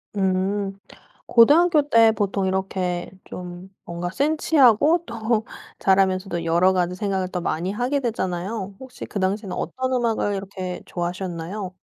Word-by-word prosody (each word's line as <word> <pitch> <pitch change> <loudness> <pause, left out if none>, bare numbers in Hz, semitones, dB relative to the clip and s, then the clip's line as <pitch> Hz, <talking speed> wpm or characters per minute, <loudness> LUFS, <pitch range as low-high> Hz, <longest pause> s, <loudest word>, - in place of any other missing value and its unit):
음. 195 +1 0 0.5
고등학교 295 +5 +5
때 225 -1 +6
보통 200 -2 -1
이렇게 185 -2 -2
좀 180 +1 -9
뭔가 170 +1 -4
센치하고 300 - +3
또 225 -1 -1 0.3
자라면서도 190 -2 +1
여러 170 +3 +4
가지 180 -1 0
생각을 190 -1 -1
더 180 -1 -3
많이 175 +3 -2
하게 245 +6 0
되잖아요. 195 -3 -3
혹시 260 -1 -9
그 200 - -5
당시에는 195 +1 -1
어떤 260 0 -3
음악을 230 -4 0
이렇게 190 -2 -5
좋아하셨나요? 180 +2 -4
195 Hz, 310 characters per minute, -23 LUFS, 185-230 Hz, 0.5 s, 때